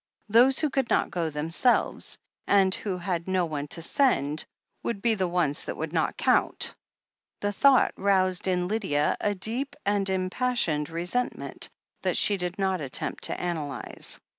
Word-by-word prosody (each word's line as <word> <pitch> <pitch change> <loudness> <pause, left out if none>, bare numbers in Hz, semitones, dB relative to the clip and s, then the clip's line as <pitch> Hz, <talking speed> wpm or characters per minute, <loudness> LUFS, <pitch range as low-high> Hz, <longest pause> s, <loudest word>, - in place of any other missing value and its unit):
Those 245 +5 +5
who 305 -3 +1
could 270 -3 0
not - - +1
go 170 -3 -1
themselves, 165 - 0 0.3
and 195 -2 +4
who 195 -3 -1
had 175 -1 -3
no 185 -2 +1
one 150 -3 -4
to 165 +3 -1
send, 160 - +1 0.4
would 230 - -3
be 230 +3 +2
the 190 -4 0
ones 170 -5 0
that - - -5
would - - -4
not - - 0
count. - - +2 0.7
The 205 - 0
thought 275 +4 +4
roused 190 -2 +2
in 180 -1 +1
Lydia 190 -8 0
a 205 0 0
deep 240 +9 -2
and 200 -1 +1
impassioned 185 - 0
resentment, 180 +9 -2 0.3
that - - 0
she 205 - +5
did 180 +1 -4
not 190 -3 0
attempt 135 -3 -2
to - - +1
analyze. 160 -5 -3
185 Hz, 160 wpm, -27 LUFS, 170-215 Hz, 0.7 s, Those